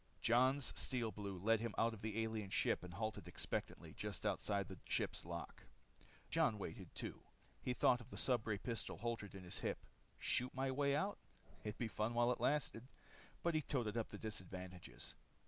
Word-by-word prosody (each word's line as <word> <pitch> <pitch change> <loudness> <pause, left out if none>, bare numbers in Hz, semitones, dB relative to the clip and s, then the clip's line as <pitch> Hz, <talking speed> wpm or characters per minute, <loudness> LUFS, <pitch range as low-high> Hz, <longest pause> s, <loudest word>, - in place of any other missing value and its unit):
Jon's 130 +4 +4
Steel 120 -4 0
Blue 100 -1 -4
led 110 +5 +4
him 115 -1 -2
out 115 0 +4
of 110 - -8
the 110 +1 0
alien 110 -3 -2
ship - - +3
and 90 -1 -7
halted 110 +2 -2
expectantly - - -3
just - - -4
outside 100 -2 +1
the 95 -2 -8
ship's - - 0
lock. 85 0 -5 0.7
Jon - - +5
Karyl - - -7
waited, - - -6
too. - - -4 0.4
He 125 - 0
thought 125 0 +5
of 120 - -12
the - - -7
stubray 110 -5 +2
pistol 110 -1 -2
holstered 115 -3 -2
at 95 - -7
his 90 - -4
hip. - - 0 0.4
Shoot 125 +1 +2
my 130 0 +1
way 140 +1 +3
out? 195 +7 +1 0.4
It'd 105 -1 -3
be 120 - 0
fun 110 +2 0
while 120 +1 +5
it 125 - -1
lasted. 130 -4 +2 0.6
But 170 - +3
he 155 - +3
toted 120 -7 0
up 115 -2 0
the 105 - -6
disadvantages. 95 -4 -6
115 Hz, 185 wpm, -41 LUFS, 100-125 Hz, 0.7 s, Jon